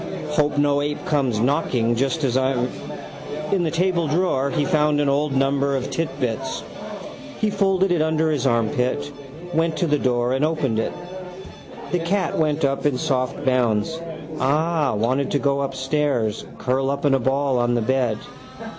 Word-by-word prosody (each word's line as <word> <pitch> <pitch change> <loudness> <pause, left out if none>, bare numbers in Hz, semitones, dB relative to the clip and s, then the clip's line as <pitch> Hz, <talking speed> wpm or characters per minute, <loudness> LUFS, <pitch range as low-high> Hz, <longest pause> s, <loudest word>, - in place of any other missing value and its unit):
Hope 150 -1 +1
no 145 0 +3
ape 145 0 -3
comes 135 -7 +1
knocking 125 -3 +1
just 135 +6 0
as 130 -3 +1
I'm. 130 -1 +1 0.8
In 195 -2 +2
the 165 - +1
tabledrawer 165 -4 +1
he 145 - 0
found 150 -4 +2
an 145 - +2
old 145 +1 +1
number 140 +1 +2
of 130 -1 -3
Titbits. 135 -8 -2 0.8
He 215 -1 +1
folded 195 -2 +2
it 175 -3 +2
under 160 0 +1
his 140 -3 0
armpit, 125 +4 0 0.4
went 165 0 +1
to 180 - +1
the 150 -2 +2
door 125 -1 +1
and 135 +2 0
opened 150 -8 +1
it. - - -1 1.0
The 180 - +1
cat 180 +2 0
went 155 -1 +1
up 140 +1 +1
in 140 -3 0
soft 130 -1 -1
bounds. 130 +4 +1 0.4
Ah, 155 -1 +1
wanted 130 +6 +1
to - - +1
go 140 0 +1
upstairs, 135 -4 -1
curl 135 +1 0
up 140 +1 -2
in 140 - +4
a 135 - +3
ball 135 +1 +1
on 120 0 +2
the 120 - +1
bed. 125 -3 +1
140 Hz, 165 wpm, -22 LUFS, 130-155 Hz, 1.0 s, in